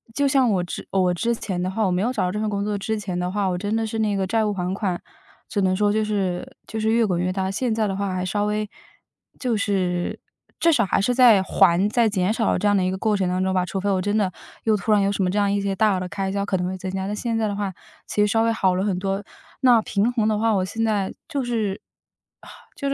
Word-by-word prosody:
就 285 0 +2
像 265 -3 +3
我 185 -4 +1
之 175 - -7
我 185 -2 +2
之 235 +7 0
前 185 -5 -4
的 185 - -1
话， 215 +4 -1
我 185 - +1
没 180 - 0
有 240 +5 +1
找 255 - -1
到 180 - -1
这 210 - -3
份 215 0 -1
工 200 -1 -2
作 210 0 -1
之 215 +2 -2
前 185 -3 -4
的 180 0 -2
话， 200 -1 0
我 180 - -1
真 205 +4 -2
的 225 0 0
是 220 0 -4
那 210 -2 +1
个 195 -1 0
债 220 +3 +1
务 210 - 0
还 180 -1 -2
款， 190 -3 -2 0.5
只 200 - -1
能 185 -1 +2
说 205 +1 +2
就 220 - +1
是 205 +4 -2
就 220 - -5
是 220 - +1
越 230 0 +3
滚 180 -4 0
越 180 +1 0
大。 190 0 -2
现 225 +3 -1
在 220 -1 +1
的 195 - -2
话， 200 -1 -2
还 185 0 -2
稍 205 +3 0
微， 210 0 -1 0.7
就 245 -4 0
是， 185 -4 -1 0.4
至 335 - +4
少 - - +3
还 - - +1
是 245 +5 +1
在 235 -6 +6
还、 190 0 +3
在 230 0 +3
减 195 0 +1
少 225 -1 +1
这 210 - 0
样 205 - +3
的 190 - +2
一 185 - +1
个 190 - -2
过 215 +1 +1
程 190 -3 0
当 185 +1 0
中 190 - 0
吧。 185 -1 +2
除 190 +2 -3
非 200 - -3
我 185 - +1
真 205 +3 0
的 195 -3 +1 0.3
又 220 -1 +3
突 215 +1 -1
然 210 - +5
有 195 - +2
什 200 - -2
么 180 - +1
这 200 - -1
样 200 -1 +2
一 200 0 0
些 195 -1 -1
大 215 0 +3
额 185 - -1
的 180 - -4
开 195 0 -3
销， 200 0 -1
可 195 - 0
能 180 - -2
会 185 - -3
增 185 0 -5
加， 190 0 -3
但 205 - -3
现 230 +1 -2
在 220 -1 +1
的 205 - -2
话， 200 -1 -2 0.4
其 210 - 0
实 - - +5
稍 225 +2 +2
微 230 - +2
好 190 -5 +2
了 185 - 0
很 195 -3 0
多。 195 +1 -2 0.4
那 245 -3 +6
平 215 +3 0
衡 225 -3 +1
的 215 -1 +1
话， 225 +1 +2
我 190 -2 +1
现 225 +4 -3
在， 210 -4 0 0.2
就 280 -4 -2
是 220 -5 -1 1.0
就 280 - -2
是， 275 - 0
205 Hz, 315 characters per minute, -23 LUFS, 190-220 Hz, 1.0 s, 在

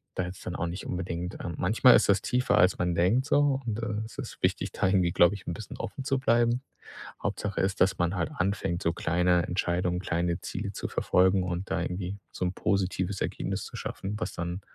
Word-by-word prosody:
da 95 - 0
hätte 90 +1 -5
es - - -14
dann 90 - -5
auch 90 - -1
nicht 85 +3 -5
unbedingt 90 -1 -4
ähm, 85 -2 -4
manchmal 110 +8 +6
ist - - +3
das 100 0 +4
tiefer, 125 0 +1
als 90 0 +4
man 90 -1 0
denkt 95 +10 +3
so. 145 -1 +3
Und, 110 -1 -2
äh, 105 -1 -2
es 115 - -12
ist - - -7
wichtig, - - +1
da - - +1
irgendwie, 90 -3 +3
glaube 85 +3 +5
ich, 100 - -11
'n 85 - -1
bisschen 105 - -8
offen 135 - -5
zu 135 -2 +1
bleiben. 120 0 +2 0.6
Hauptsache 100 -1 -2
ist, 95 -1 -1
dass 95 0 +4
man 90 +2 0
halt 85 -2 -1
anfängt, 90 -1 -1
so 85 - +1
kleine 90 +1 +2
Entscheidungen, 90 0 0
kleine 85 0 -1
Ziele 100 +1 -4
zu - - -4
verfolgen 95 +1 +3
und 90 +1 -3
da 95 -2 0
irgendwie 90 +2 -3
so - - -3
'n 90 - -1
positives 95 0 -1
Ergebnis - - -2
zu - - -10
schaffen, 100 +2 -4
was 90 - -3
dann, 85 +3 -4
90 Hz, 220 wpm, -28 LUFS, 90-100 Hz, 0.6 s, manchmal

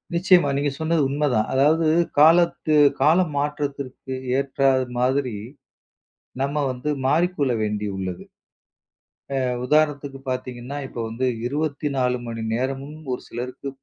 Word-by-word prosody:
நிச்சயமா. 175 -4 +4
நீங்க 145 0 +1
சொன்னது 160 0 +1
உண்மதான். 140 -6 +1
அதாவது 155 +4 +3 0.3
காலத்து 165 -1 +4 0.3
கால 160 +4 +5 0.2
மாற்றத்திற்கு 140 -3 -3 0.2
ஏற்றா 135 0 +1 0.3
மாதிரி, 130 -1 +1 1.1
நம்ம 145 +1 0
வந்து 130 +4 -4 0.2
மாறிக்கொள்ள 155 -3 +2
வேண்டியுள்ளது. 100 -4 -3 1.2
அ - - 0 0.2
உதாரணத்துக்குப் 145 -2 0
பாத்தீங்கன்னா, 130 +1 -5
இப்ப 120 - -9
வந்து 125 +3 -1 0.2
24 140 -3 -1
மணி 115 -1 -5
நேரமும் 135 +4 -3 0.2
ஒரு - - -5
சிலருக்கு 125 +3 -6
140 Hz, 105 wpm, -23 LUFS, 125-150 Hz, 1.2 s, கால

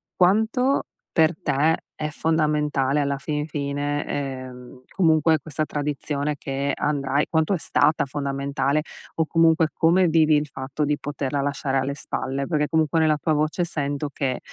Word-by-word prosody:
quanto 220 +8 +3 0.3
per 160 +1 +3
te 150 +3 +2 0.2
è 150 0 -3
fondamentale 150 -3 +1
alla 140 -1 -1
fin 150 +1 -2
fine, 145 0 -2
ehm, 130 -2 -6
comunque 160 -3 +4
questa 155 +1 -3
tradizione 145 0 -2
che 135 +1 -2
andrai 140 -1 0
quanto 160 +4 +1
è - - +1
stata 155 -1 +2
fondamentale, 140 +1 -1 0.3
o 160 - +1
comunque 165 -1 +4
come 175 +3 +3
vivi 160 -1 +4
il 150 0 +1
fatto 135 +2 -3
di 145 0 0
poterla 140 -1 -2
lasciare 140 -1 -1
alle 135 +1 -1
spalle, 135 -1 -3
perché 150 -3 +1
comunque 160 0 +2
nella 155 -1 +3
tua 155 +2 0
voce 155 +4 0
sento 145 -2 -3
che, 130 -2 -1
150 Hz, 150 wpm, -23 LUFS, 140-160 Hz, 0.3 s, comunque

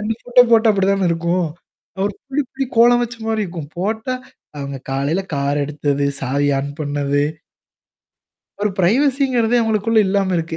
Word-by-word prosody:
2 215 +2 -1
photo 245 0 +5
போட்டா 225 -1 +5
அப்படி 195 -1 +1
தான 195 -2 +1
இருக்கும். 170 +1 0 0.6
ஒரு 205 - -1
புள்ளி 275 +2 -1
புள்ளி 270 0 -2
கோலம் 240 +1 +6
வச்ச 240 0 -4
மாரி 220 -1 0
இருக்கும். 165 -5 -7
போட்டா, 220 +6 -2 0.5
அவங்க 140 -1 -5
காலையில 140 +7 0
கார் 140 +1 0
எடுத்தது, 145 -1 -1 0.2
சாவி 140 +2 0
ஆன் 140 +1 -3
பண்ணது. 145 -1 0 1.4
ஒரு 210 - +2
பிரைவசிங்கிறதே 250 +3 +2
அவங்களுக்குள்ள 225 0 +1
இல்லாம 195 -1 +1
இருக்கு. 165 0 -4
195 Hz, 150 wpm, -19 LUFS, 145-225 Hz, 1.4 s, கோலம்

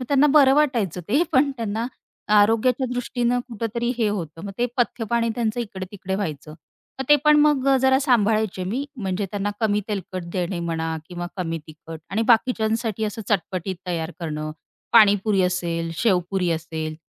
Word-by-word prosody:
मग - - -4
त्यांना 285 0 +4
बरं 275 -3 +6
वाटायचं 240 - +1
ते. 275 +10 +3
पण 275 +2 +4
त्यांना 225 0 -2 0.5
आरोग्याच्या 230 +5 +3
दृष्टीनं 245 0 0
कुठेतरी 235 +1 -2
हे 225 -3 +2
होतं. 170 -4 -5
मग 200 - -6
ते 240 - +2
पथ्यपाणी 235 -1 0
त्यांचं 230 0 -1
इकडे-तिकडे 190 -3 -5
व्हायचं. 155 -6 -4 0.4
मग 265 - -2
ते 295 - +8
पण 300 0 +6
मग 295 -3 +3
जरा 265 0 +5
सांभाळायचे 220 -7 +1
मी 235 +10 -2
म्हणजे 195 -3 -2
त्यांना 205 0 -2
कमी 210 -2 +2
तेलकट 185 -3 -4
देणे 180 -1 -2
म्हणा 165 -1 -2
किंवा 175 -1 -5
कमी 165 -3 -2
तिखट 160 +1 -10
आणि 215 +4 0
बाकीच्यांसाठी 225 -2 +2
असं 215 +1 -4
चटपटीत 185 -1 -1
तयार 165 -2 -2
करणं. 155 -2 -4 0.4
पाणीपुरी 205 -3 +5
असेल, 170 -2 -1
शेवपुरी 180 -3 +1
असेल 160 -1 -3
205 Hz, 155 wpm, -23 LUFS, 180-235 Hz, 0.5 s, ते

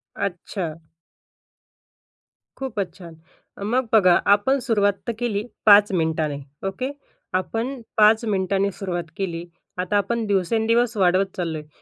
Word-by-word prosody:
अच्छा. 175 -3 -4 1.8
खूपच 220 -8 -3
छान, 170 -3 -11 0.5
मग 240 +4 0
बघा 185 -5 +6
आपण 265 +7 +2
सुरुवात 205 -3 +3
तर 235 - 0
केली 215 -4 -1 0.2
5 205 -1 +7
मिनिटांनी 160 -4 0 0.3
ओके. 255 +8 -3 0.4
आपण 230 +8 -2 0.2
5 220 +2 +5
मिनिटांनी 195 -1 0
सुरुवात 175 -4 -4
केली, 175 -3 -3 0.3
आता 185 +3 0
आपण 225 +3 0
दिवसेंदिवस 225 +4 +1
वाढवत 185 +1 +3
चाललो 165 -3 -2
आहे. 150 - -9
200 Hz, 115 wpm, -23 LUFS, 175-225 Hz, 1.8 s, 5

